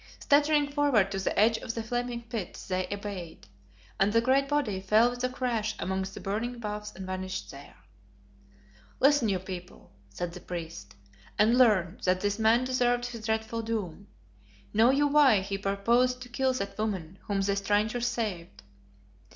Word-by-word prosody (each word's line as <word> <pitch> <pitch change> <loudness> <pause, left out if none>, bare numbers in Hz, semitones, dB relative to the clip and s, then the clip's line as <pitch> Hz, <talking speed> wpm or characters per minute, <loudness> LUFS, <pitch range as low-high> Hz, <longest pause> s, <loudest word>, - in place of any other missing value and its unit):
Staggering 290 0 +3
forward 280 -10 +2
to 195 - -2
the 190 - -2
edge 225 +1 +4
of 225 - -5
the 230 - -3
flaming 240 +1 -3
pit, 225 -5 -6
they 185 -1 -1
obeyed, 200 -5 -6 0.5
and 195 +2 +3
the 230 - +4
great 265 +3 +2
body 275 -10 0
fell 215 +5 +3
with 245 0 -6
a 255 - +1
crash 235 -4 -2
amongst 190 +1 -3
the - - -7
burning 225 +5 -3
boughs 210 -1 -5
and 190 - -7
vanished 185 0 -5
there. 140 +1 -12 1.2
"Listen, 275 -4 +4
you 195 - +1
people," 180 -1 -9 0.2
said 170 - -5
the 180 - -8
priest, 160 - -7 0.4
"and 220 +3 +4
learn 210 -8 +3
that 185 0 +2
this 205 +1 -1
man 225 +3 +4
deserved 245 -1 +1
his 230 -3 -6
dreadful 220 +1 -1
doom. 210 -4 -4 0.7
Know 225 +3 +5
you 285 +2 +3
why 280 -8 +5
he 195 +1 -4
purposed 230 +6 +1
to 245 - -12
kill 260 +2 +1
that 200 -4 -5
woman 190 -5 -3
whom 200 -1 0
the 200 0 +1
strangers 210 +4 0
saved? 210 -8 -4
215 Hz, 165 wpm, -28 LUFS, 195-245 Hz, 1.2 s, Know